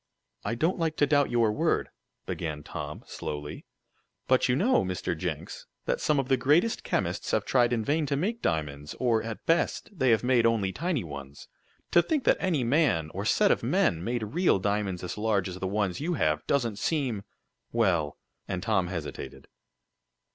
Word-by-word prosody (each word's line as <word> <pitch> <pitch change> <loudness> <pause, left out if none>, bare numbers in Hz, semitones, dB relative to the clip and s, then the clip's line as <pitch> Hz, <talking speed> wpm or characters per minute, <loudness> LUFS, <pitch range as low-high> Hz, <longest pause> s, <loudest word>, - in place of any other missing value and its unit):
"I 115 - -1
don't 165 +9 0
like 160 -1 0
to 145 - +4
doubt 145 0 +3
your 115 -3 +3
word," 105 - 0 0.4
began 75 -3 -4
Tom, - - -6
slowly, 75 0 -6 0.6
"but 130 0 +3
you 125 - +3
know, 245 - +3
Mr. - - -2
Jenks, - - -5 0.2
that - - -1
some 150 - +2
of 135 - -1
the 135 -1 +3
greatest 150 - +2
chemists - - -1
have - - +1
tried 120 -2 +3
in 115 -3 0
vain 150 +1 +1
to 140 - 0
make 215 +11 -1
diamonds; 75 -3 -2
or, 115 -3 +2
at 115 -1 -7
best, 165 +6 +1
they 130 -6 +2
have 115 0 +3
made 125 -2 +4
only 105 -5 +1
tiny 170 - -1
ones. 70 -3 -9 0.4
To 170 - +6
think 300 - -1
that - - +4
any 165 -8 +1
man, 115 - +2
or - - -4
set - - +4
of - - +2
men, 85 0 +1
made 120 +2 -1
real 175 - +3
diamonds 100 -2 -1
as 90 +3 -5
large 105 -3 +1
as 90 0 -6
the 95 - -2
ones 100 +1 -1
you 170 +3 -1
have, 75 - 0
doesn't 120 -7 0
seem 135 -10 0 0.5
well 85 -11 +1 0.2
" - - -51
and 90 -1 -3
Tom 95 -5 +1
hesitated. 85 -4 -6
115 Hz, 185 wpm, -28 LUFS, 95-145 Hz, 0.6 s, To